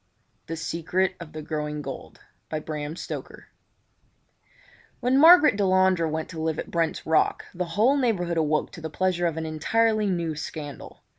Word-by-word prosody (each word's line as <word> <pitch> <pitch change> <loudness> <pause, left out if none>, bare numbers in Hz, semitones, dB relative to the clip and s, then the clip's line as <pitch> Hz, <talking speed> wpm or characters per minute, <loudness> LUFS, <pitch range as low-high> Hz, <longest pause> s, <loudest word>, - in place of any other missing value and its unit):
The 165 - -4
Secret 175 +3 -1
of 170 -3 -9
the 155 0 -6
Growing 150 -1 -4
Gold 135 -1 -8 0.3
When 155 -1 -4 2.2
Margaret 325 - +8
Delandre 185 -4 +3
went 155 +1 -3
to 165 -3 -6
live 160 -1 -1
at - - -6
Brent's 165 -2 -1
Rock 160 -1 +2
the 180 0 -2
whole 245 +7 +4
neighbourhood 185 -10 0
awoke 155 -1 +1
to 165 - -10
the 160 - -5
pleasure 175 +1 0
of 165 -1 -3
an 160 - -3
entirely 215 +7 +1
new 170 -4 -1
scandal. 145 -2 -8
165 Hz, 145 wpm, -25 LUFS, 155-190 Hz, 2.2 s, Margaret